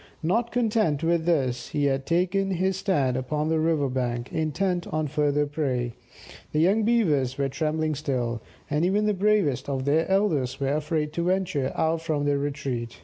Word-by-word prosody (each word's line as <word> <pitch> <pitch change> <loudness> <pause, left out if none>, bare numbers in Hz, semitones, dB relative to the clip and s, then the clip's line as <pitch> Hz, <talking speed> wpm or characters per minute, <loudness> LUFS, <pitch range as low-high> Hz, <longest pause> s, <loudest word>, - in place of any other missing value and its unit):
Not 225 +8 +1
content 215 - +1
with 165 0 +1
this, 135 -8 0
he 145 -1 0
had 135 -1 0
taken 185 +3 +1
his 190 +1 0
stand 180 -10 +1
upon 150 +4 -1
the 160 0 +2
river 155 -3 +1
bank, 125 -2 -3
intent 175 +3 -1
on 155 0 -1
further 150 0 +1
prey. 130 -5 -2 0.6
The 150 - +2
young 195 +7 +3
Beavers 160 - +2
were 140 -1 0
trembling 155 +2 -1
still, 125 -6 -2 0.3
and 150 +2 0
even 200 +4 +2
the 210 - +2
bravest 200 -10 +1
of 135 -1 -2
their 155 +5 +2
elders 165 -11 +1
were 135 0 0
afraid 150 0 -1
to 170 +1 -1
venture 180 -7 0
out 160 0 +1
from 155 -3 -1
their 145 -1 +1
retreat. 135 -5 -4
155 Hz, 175 wpm, -26 LUFS, 140-180 Hz, 0.6 s, young